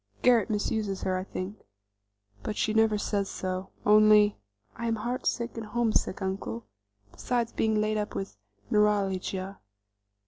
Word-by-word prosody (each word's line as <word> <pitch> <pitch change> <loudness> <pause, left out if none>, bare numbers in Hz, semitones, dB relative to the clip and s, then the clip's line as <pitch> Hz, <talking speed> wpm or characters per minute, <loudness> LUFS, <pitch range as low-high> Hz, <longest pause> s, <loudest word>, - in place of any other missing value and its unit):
Garret 240 -5 +5
misuses 210 -2 -1
her, 185 - 0
I 185 - -2
think, 195 +2 -6 0.8
but 210 - -4
she 215 - +1
never 220 -1 +4
says 200 -1 -1
so; 185 0 -4 0.2
only 210 0 +6 0.4
'I 235 - -3
am 225 - +1
heartsick 240 +1 -2
and 225 -2 -5
homesick, 225 -4 0
uncle, 190 - -4 0.5
besides 240 -2 -2
being 220 -1 +1
laid 215 0 +1
up 210 0 -3
with 195 - -4 0.4
neuralgia. 195 -2 +1
210 Hz, 135 wpm, -28 LUFS, 195-220 Hz, 0.8 s, only